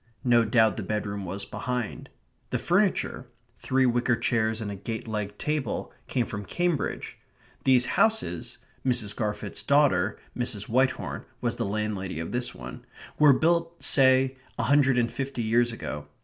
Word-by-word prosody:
No 120 Hz, -2 st, +5 dB
doubt 110 Hz, -2 st, +3 dB
the -, -, -2 dB
bedroom 100 Hz, 0 st, -3 dB
was 95 Hz, +3 st, -5 dB
behind. 125 Hz, -3 st, -4 dB, 0.4 s
The -, -, 0 dB
furniture 180 Hz, -, +1 dB, 0.3 s
three 130 Hz, 0 st, +2 dB
wicker 120 Hz, 0 st, +2 dB
chairs 110 Hz, -1 st, 0 dB
and 105 Hz, -3 st, -4 dB
a -, -, -5 dB
gate 110 Hz, +4 st, -5 dB
legged 105 Hz, -2 st, -4 dB
table 150 Hz, -6 st, -2 dB
came 125 Hz, -2 st, 0 dB
from 105 Hz, -2 st, -5 dB
Cambridge. 175 Hz, -, -2 dB, 0.5 s
These 125 Hz, -2 st, +5 dB, 0.2 s
houses 220 Hz, -, 0 dB, 0.3 s
(Mrs. 120 Hz, -5 st, +1 dB
Garfit's 105 Hz, -2 st, -3 dB
daughter, 135 Hz, -9 st, +3 dB, 0.2 s
Mrs. 120 Hz, -5 st, -2 dB
Whitehorn, 130 Hz, +3 st, 0 dB
was -, -, -1 dB
the -, -, -1 dB
landlady 100 Hz, -4 st, -3 dB
of 80 Hz, -, -4 dB
this 125 Hz, 0 st, -2 dB
one) 65 Hz, 0 st, -9 dB, 0.4 s
were 150 Hz, -1 st, +8 dB
built, 170 Hz, +3 st, +1 dB
say, 130 Hz, -1 st, +4 dB, 0.2 s
a -, -, 0 dB
hundred 140 Hz, -3 st, +4 dB
and 120 Hz, -1 st, +2 dB
fifty 135 Hz, -3 st, -3 dB
years 120 Hz, +2 st, +2 dB
ago. 75 Hz, -10 st, -6 dB
120 Hz, 150 wpm, -27 LUFS, 105-135 Hz, 0.5 s, were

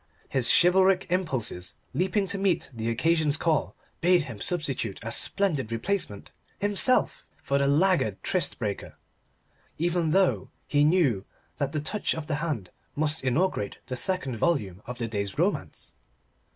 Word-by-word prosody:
His 130 Hz, -3 st, +3 dB
chivalric 185 Hz, +1 st, +4 dB
impulses, 130 Hz, -, -2 dB, 0.2 s
leaping 190 Hz, +3 st, +1 dB
to 195 Hz, +1 st, -2 dB
meet 190 Hz, -6 st, 0 dB
the 115 Hz, -1 st, -3 dB
occasion's 155 Hz, +4 st, +2 dB
call, 160 Hz, -2 st, 0 dB, 0.2 s
bade 175 Hz, -1 st, +4 dB
him 115 Hz, -7 st, -9 dB
substitute 140 Hz, -, 0 dB
a 115 Hz, -, -4 dB
splendid 150 Hz, -, +1 dB
replacement 115 Hz, -, -3 dB, 0.3 s
himself, 205 Hz, +5 st, +2 dB, 0.2 s
for 140 Hz, 0 st, +1 dB
the 140 Hz, -, +2 dB
laggard 150 Hz, -, +2 dB
tryst 180 Hz, -6 st, 0 dB
breaker. 105 Hz, -3 st, -4 dB, 0.8 s
Even 170 Hz, 0 st, 0 dB
though 190 Hz, +3 st, +2 dB, 0.2 s
he 145 Hz, 0 st, +2 dB
knew 150 Hz, -, +3 dB, 0.4 s
that 140 Hz, -1 st, -1 dB
that 150 Hz, -1 st, -3 dB
touch 210 Hz, +4 st, -1 dB
of 160 Hz, -2 st, -5 dB
the 150 Hz, -2 st, -2 dB
hand 135 Hz, -, -3 dB, 0.2 s
must 150 Hz, 0 st, 0 dB
inaugurate 135 Hz, -, 0 dB
the 130 Hz, -, -4 dB
second 135 Hz, -3 st, 0 dB
volume 105 Hz, -, 0 dB
of 125 Hz, 0 st, -6 dB
the 115 Hz, -1 st, -3 dB
day's 100 Hz, -3 st, -3 dB
romance. -, -, -2 dB
150 Hz, 145 wpm, -27 LUFS, 115-180 Hz, 0.8 s, chivalric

